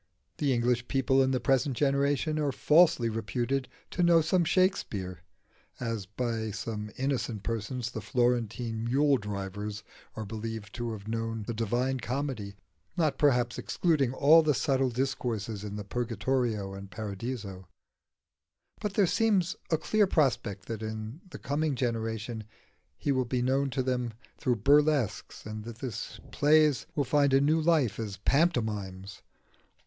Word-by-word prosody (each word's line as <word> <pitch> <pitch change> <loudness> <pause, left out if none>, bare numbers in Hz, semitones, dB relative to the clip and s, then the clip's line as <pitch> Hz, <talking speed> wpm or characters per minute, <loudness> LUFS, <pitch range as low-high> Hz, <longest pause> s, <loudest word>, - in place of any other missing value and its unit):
The 145 -2 +2
English 125 0 +1
people 135 0 +2
in 130 - +3
the 130 -1 +1
present 135 -1 +1
generation 140 +2 +1
are 145 -2 +1
falsely 155 -3 +4
reputed 120 +5 -1 0.2
to 180 - -1
know 170 -1 +6
Shakspere 160 - +1 0.6
(as, 115 -5 -3
by 115 +1 -2
some 105 +1 -4
innocent 125 -6 -2
persons, 115 +1 -3
the - - -5
Florentine 120 -2 0
mule 140 +3 +3
drivers 105 0 -5 0.3
are 110 - -4
believed 110 -1 -6
to 120 -1 -3
have 105 -1 -9
known 115 0 -2
the 115 - -4
Divina 120 +4 0
Commedia, 125 -6 -3 0.4
not, 155 -4 +1
perhaps, 125 -5 +2
excluding 150 -8 +1
all 150 +5 +6
the 150 -3 +2
subtle 135 -2 +1
discourses 115 -5 -2
in 105 -1 -5
the 105 - -4
Purgatorio 115 -2 -1
and 100 0 -8
Paradiso); 100 -2 -5 1.1
but 205 -2 -3
there 205 - +5
seems 190 -2 +2
a 160 - +3
clear 210 +5 +2
prospect 120 - 0
that 115 -2 -5
in 110 +6 -5
the - - -8
coming 145 +1 -1
generation 115 -2 -2 0.5
he 145 - -1
will 130 -2 +1
be 125 0 -1
known 135 +2 +1
to 130 0 -1
them 125 -2 -1 0.3
through 125 - +1
burlesques, 145 +2 +2
and 110 0 -6
that 115 0 -8
his 120 -4 -6
plays 150 -1 +4
will 145 - +2
find 140 0 +3
a - - +6
new 155 +3 +3
life 155 -10 +2
as 105 -3 -4
pantomimes. 105 - 0
125 Hz, 145 wpm, -29 LUFS, 110-140 Hz, 1.1 s, know